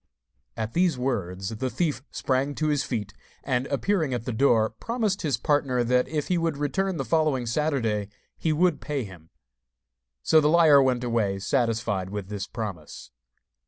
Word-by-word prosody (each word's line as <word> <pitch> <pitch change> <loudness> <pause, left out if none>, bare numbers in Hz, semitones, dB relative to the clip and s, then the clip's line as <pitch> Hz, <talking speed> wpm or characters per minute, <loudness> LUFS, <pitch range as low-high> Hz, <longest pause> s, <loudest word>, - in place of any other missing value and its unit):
At 110 0 -3
these 175 -5 +2
words 100 -7 -2
the 115 +4 -3
thief 160 +1 -1
sprang 135 +2 -1
to 155 -1 0
his 145 -2 +1
feet, 105 -5 -4 0.3
and, 130 0 -1
appearing 155 -2 0
at 120 - -5
the 125 - -3
door, 110 -3 +3
promised 215 - -2
his 140 -7 0
partner 135 -2 +1
that 125 +1 +2
if 150 -2 -2
he 180 -2 +1
would 165 -3 -1
return 185 +6 -1
the 135 - -2
following 145 -1 +1
Saturday 115 -6 0 0.3
he 160 - -1
would 175 +4 +2
pay 145 -4 -2
him. 90 -6 -12 0.9
So 160 - +5
the 150 - +3
liar 155 -4 +6
went 125 -2 +1
away 115 -5 0
satisfied 110 -3 0
with 100 -1 -5
this 100 -2 -4
promise. 100 - -7
130 Hz, 165 wpm, -26 LUFS, 110-155 Hz, 0.9 s, liar